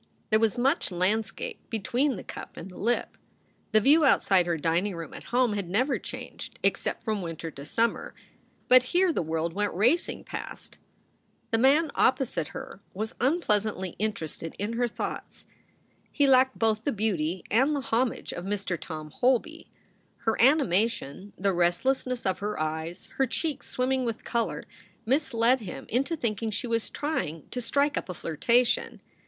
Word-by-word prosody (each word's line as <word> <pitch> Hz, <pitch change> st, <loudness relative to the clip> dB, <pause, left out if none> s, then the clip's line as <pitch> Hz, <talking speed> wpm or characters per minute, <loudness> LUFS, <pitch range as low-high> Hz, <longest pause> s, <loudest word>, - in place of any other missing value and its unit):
There 215 Hz, -, +5 dB
was 225 Hz, +1 st, +2 dB
much 270 Hz, +7 st, +1 dB
landscape 195 Hz, +3 st, -1 dB
between 250 Hz, +5 st, 0 dB
the -, -, -7 dB
cup -, -, -9 dB
and 185 Hz, -, -8 dB
the -, -, -12 dB
lip. 240 Hz, +3 st, -1 dB, 0.5 s
The 215 Hz, -, +6 dB
view 290 Hz, +8 st, +5 dB
outside 190 Hz, -9 st, +4 dB
her 170 Hz, -1 st, +1 dB
dining 170 Hz, +5 st, 0 dB
room 165 Hz, -1 st, -7 dB
at -, -, -10 dB
home 245 Hz, -2 st, +2 dB
had 200 Hz, -4 st, -3 dB
never 255 Hz, +9 st, +1 dB
changed -, -, -8 dB
except -, -, 0 dB
from 215 Hz, -3 st, -1 dB
winter 165 Hz, -1 st, -5 dB
to 140 Hz, -, -10 dB
summer. 230 Hz, +8 st, -1 dB, 0.5 s
But 255 Hz, 0 st, +8 dB, 0.2 s
here 365 Hz, -2 st, +4 dB
the -, -, 0 dB
world 160 Hz, +1 st, -2 dB
went 205 Hz, 0 st, -1 dB
racing 245 Hz, -, +2 dB
past. -, -, -8 dB, 0.7 s
The 225 Hz, -, +2 dB
man 285 Hz, +5 st, +4 dB
opposite 240 Hz, -, +1 dB
her -, -, -9 dB
was 215 Hz, +3 st, -3 dB
unpleasantly 215 Hz, -, +1 dB
interested 165 Hz, -6 st, -3 dB
in 205 Hz, +3 st, -2 dB
her 240 Hz, +1 st, +1 dB
thoughts. 230 Hz, -, -6 dB, 0.7 s
He 285 Hz, -, +3 dB
lacked 260 Hz, -1 st, +4 dB
both 220 Hz, -1 st, +1 dB
the 285 Hz, -, +1 dB
beauty 190 Hz, -, -1 dB
and 265 Hz, +7 st, +3 dB
the 280 Hz, -, -1 dB
homage 240 Hz, 0 st, -1 dB
of 175 Hz, -, -6 dB
Mr. 195 Hz, -2 st, -2 dB
Tom 155 Hz, -2 st, -7 dB
Holby. 250 Hz, -, 0 dB, 0.6 s
Her 225 Hz, -, +2 dB
animation, 215 Hz, -, +2 dB
the 195 Hz, 0 st, +1 dB
restlessness 245 Hz, +9 st, +1 dB
of 190 Hz, -1 st, 0 dB
her 210 Hz, -2 st, -3 dB
eyes, 160 Hz, +3 st, -3 dB
her 270 Hz, -, +3 dB
cheeks 305 Hz, +3 st, -2 dB
swimming 260 Hz, +1 st, 0 dB
with 230 Hz, -2 st, -3 dB
color, 235 Hz, -1 st, -1 dB, 0.4 s
misled 255 Hz, -1 st, +2 dB
him 210 Hz, -6 st, -7 dB
into 275 Hz, +8 st, +1 dB
thinking 225 Hz, -5 st, -2 dB
she 215 Hz, +4 st, -2 dB
was 230 Hz, -1 st, -1 dB
trying 165 Hz, -, -3 dB
to 250 Hz, -, -3 dB
strike 280 Hz, +5 st, +1 dB
up -, -, -11 dB
a 180 Hz, -, -4 dB
flirtation. 235 Hz, +11 st, +1 dB
220 Hz, 160 wpm, -27 LUFS, 185-255 Hz, 0.7 s, But